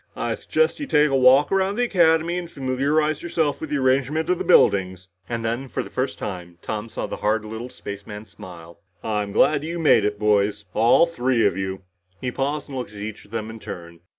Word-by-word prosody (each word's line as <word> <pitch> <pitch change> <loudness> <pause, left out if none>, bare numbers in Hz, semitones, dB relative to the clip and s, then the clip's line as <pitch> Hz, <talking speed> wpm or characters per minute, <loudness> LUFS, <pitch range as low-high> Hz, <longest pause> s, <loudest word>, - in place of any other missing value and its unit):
I - - -2
suggest 475 -8 0
you 285 - -4
take 150 - +3
a - - +2
walk 130 +2 +5
around 195 +1 +1
the 245 - +1
Academy 170 -5 +3
and 175 -2 -7
familiarize 145 +3 0
yourselves 160 -4 -1
with 160 - -5
the 150 - 0
arrangement 140 +5 +1
of 180 - 0
the - - -1
buildings." 95 - +3 0.2
And 115 -1 -3
then, 120 +4 -2
for - - -3
the - - -12
first 130 +1 -2
time, 90 -3 -6
Tom 110 +1 -4
saw - - -4
the - - -6
hard 105 +1 0
little 110 +3 -6
spaceman 105 -1 -8
smile. 85 -6 -12 0.2
"I'm 105 -2 -2
glad 145 +7 +3
you 165 +2 -4
made 150 -9 +4
it, 105 0 -1
boys. 105 0 +1
All 115 +8 +5
three 125 -8 0
of 100 - +2
you." 95 0 -4 0.4
He 125 - -3
paused 140 +3 -2
and 135 -3 -5
looked 120 -4 -7
at - - -10
each 105 +1 -7
of - - -21
them 110 0 -4
in 110 - -10
turn. 85 -4 -9
120 Hz, 215 wpm, -23 LUFS, 105-150 Hz, 0.4 s, walk